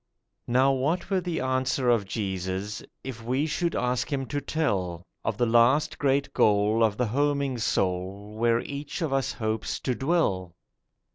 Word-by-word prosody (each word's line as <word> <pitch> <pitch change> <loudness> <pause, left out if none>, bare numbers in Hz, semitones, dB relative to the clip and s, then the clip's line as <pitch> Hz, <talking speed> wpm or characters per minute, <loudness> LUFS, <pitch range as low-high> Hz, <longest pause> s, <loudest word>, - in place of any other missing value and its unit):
Now 130 +3 +4
what 155 +9 -1
were 190 -1 +2
the 175 -2 -2
answer 130 0 0
of 110 -5 +1
Jesus 95 0 -3 0.2
If 125 -4 -7
we 130 +5 0
should 170 +2 -1
ask 125 +4 0
Him 135 -2 -1
to 145 - -2
tell 95 - -1 0.2
Of 110 - -1
the 120 - +2
last 120 +6 +3
great 140 0 +1
goal 105 +2 +3
of 110 -2 +2
the 125 - +1
homing 140 +1 0
soul 95 +1 -1
Where 115 +1 +2
each 145 +5 -5
of 150 -4 -1
us 135 -1 0
hopes 110 -1 -2
to 130 - 0
dwell? 110 - 0
125 Hz, 160 wpm, -27 LUFS, 105-140 Hz, 0.2 s, Now